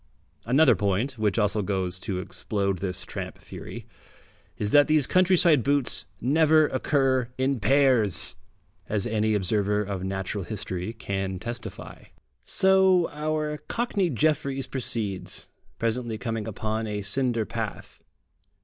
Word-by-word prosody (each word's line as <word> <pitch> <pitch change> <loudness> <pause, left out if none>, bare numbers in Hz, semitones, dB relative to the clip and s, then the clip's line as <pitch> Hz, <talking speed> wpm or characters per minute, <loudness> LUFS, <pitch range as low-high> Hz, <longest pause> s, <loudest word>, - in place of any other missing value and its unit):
Another 135 +4 +5
point, 105 +6 -1
which 105 -1 +1
also 105 -1 +1
goes 95 -2 -1
to 95 0 -3
explode 100 +1 -2
this 90 -1 -3
tramp - - -6
theory, - - -9 0.7
is 105 0 -2
that 145 0 +6
these 155 -3 +4
countryside 180 -5 +4
boots 140 +2 0
never 155 +3 +4
occur 130 -2 +1
in 130 0 0
pairs, 130 -6 +3 0.5
as 105 -2 0
any 110 -2 +1
observer 105 +1 +1
of 95 -2 -4
natural 95 +1 -3
history 95 +1 -4
can 95 -4 -3
testify.... 120 +4 -7 0.4
So 190 -2 +4
our 150 0 -2
Cockney 230 -6 0
Jefferies 140 -1 0
proceeds, 110 -7 -4 0.3
presently 115 0 -1
coming 110 +1 -3
upon 110 +1 -3
a 105 -1 -3
cinder 120 +1 0
path. - - -6
115 Hz, 120 wpm, -26 LUFS, 100-145 Hz, 0.7 s, that